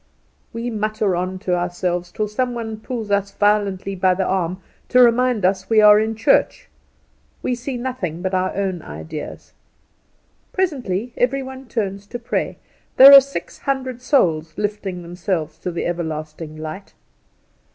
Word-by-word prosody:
We 235 Hz, +1 st, -4 dB
mutter 215 Hz, -3 st, -1 dB
on 185 Hz, +2 st, -2 dB
to 180 Hz, -, +2 dB
ourselves, 175 Hz, 0 st, -2 dB
till 215 Hz, -, -2 dB
some 245 Hz, +4 st, -2 dB
one 225 Hz, -2 st, -5 dB
pulls 225 Hz, -3 st, -5 dB
us 200 Hz, 0 st, +1 dB
violently 205 Hz, -2 st, +1 dB
by 185 Hz, -1 st, +2 dB
the 190 Hz, 0 st, -1 dB
arm 185 Hz, -1 st, -1 dB, 0.3 s
to 250 Hz, -, +4 dB
remind 245 Hz, -3 st, +4 dB
us 190 Hz, 0 st, 0 dB
we 220 Hz, -1 st, +5 dB
are 210 Hz, 0 st, +8 dB
in 220 Hz, +1 st, -1 dB
church. 220 Hz, -, +2 dB, 0.7 s
We 255 Hz, -, 0 dB
see 245 Hz, +2 st, -4 dB
nothing 220 Hz, -10 st, -4 dB
but 190 Hz, 0 st, -2 dB
our 185 Hz, 0 st, 0 dB
own 190 Hz, -3 st, -2 dB
ideas. 155 Hz, 0 st, -8 dB, 1.0 s
Presently 250 Hz, -, -2 dB
every 265 Hz, +2 st, +1 dB
one 265 Hz, 0 st, -9 dB
turns 200 Hz, -4 st, -3 dB
to 240 Hz, -, -5 dB
pray. 235 Hz, 0 st, -3 dB, 0.4 s
There 275 Hz, +2 st, +11 dB
are 275 Hz, -, +12 dB
six 275 Hz, +1 st, -7 dB
hundred 260 Hz, -3 st, -3 dB
souls 165 Hz, -, +1 dB
lifting 205 Hz, -4 st, -3 dB
themselves 170 Hz, -2 st, -3 dB
to -, -, -4 dB
the 170 Hz, -, -3 dB
Everlasting 155 Hz, -2 st, -4 dB
light. 155 Hz, +5 st, -8 dB
200 Hz, 150 wpm, -21 LUFS, 180-240 Hz, 1.0 s, are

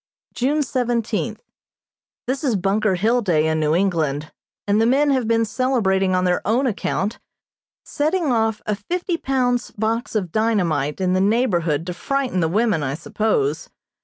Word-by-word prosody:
June 290 Hz, +5 st, +1 dB
seventeenth: 240 Hz, -, -2 dB, 0.8 s
This 260 Hz, +3 st, -2 dB
is 255 Hz, -6 st, +1 dB
Bunker 195 Hz, +1 st, +1 dB
Hill 225 Hz, +7 st, +2 dB
Day 165 Hz, -7 st, +2 dB
in 160 Hz, 0 st, 0 dB
New 155 Hz, 0 st, +1 dB
England, 160 Hz, -6 st, 0 dB, 0.4 s
and 205 Hz, +2 st, +3 dB
the 225 Hz, -, +3 dB
men 280 Hz, +4 st, +3 dB
have 260 Hz, -4 st, +1 dB
been 230 Hz, 0 st, +2 dB
celebrating 210 Hz, -5 st, +1 dB
on 185 Hz, -, +1 dB
their 180 Hz, -1 st, +1 dB
own 240 Hz, +6 st, +1 dB
account, 215 Hz, -2 st, -2 dB, 0.7 s
setting 310 Hz, 0 st, 0 dB
off 225 Hz, -2 st, 0 dB
a 210 Hz, -, 0 dB
fifty 345 Hz, -, -3 dB
pounds 250 Hz, -4 st, 0 dB
box 225 Hz, +3 st, -2 dB
of 185 Hz, -6 st, -1 dB
dynamite 185 Hz, -10 st, 0 dB
in 185 Hz, -1 st, +1 dB
the 185 Hz, -, +2 dB
neighborhood 175 Hz, -, +1 dB
to 180 Hz, -, -4 dB
frighten 270 Hz, 0 st, -1 dB
the 165 Hz, -, +2 dB
women, 210 Hz, -2 st, +1 dB
I 135 Hz, -1 st, -2 dB
suppose. 220 Hz, -, -1 dB
220 Hz, 160 wpm, -21 LUFS, 185-250 Hz, 0.8 s, and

